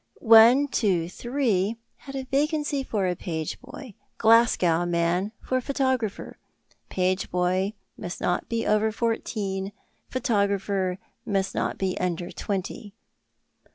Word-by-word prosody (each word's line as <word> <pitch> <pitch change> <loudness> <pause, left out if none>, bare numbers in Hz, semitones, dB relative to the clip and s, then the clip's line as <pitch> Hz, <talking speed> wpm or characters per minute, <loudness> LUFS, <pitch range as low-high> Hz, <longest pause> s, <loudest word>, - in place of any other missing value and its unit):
"123" 225 -2 +3 0.2
had 275 -1 -10
a 265 - -3
vacancy 290 +1 0
for 210 -7 -1
a 180 -1 0
page 160 -3 -4
boy, 270 -7 -10 0.2
"Glasgow 220 -7 +4
Man" 175 +3 0
for 255 - 0
a - - -1
photographer; 260 -5 -2 0.5
page 185 +1 0
boy 185 +3 0 0.3
must 175 - -6
not 175 - -1
be 230 -1 -1
over 215 +1 +2
fourteen, 205 -4 -2 0.4
photographer 200 -6 0 0.3
must 195 -4 -1
not - - -2
be 190 -1 -1
under 175 -1 -2
twenty. 200 +2 -5
205 Hz, 115 wpm, -25 LUFS, 185-240 Hz, 0.5 s, Glasgow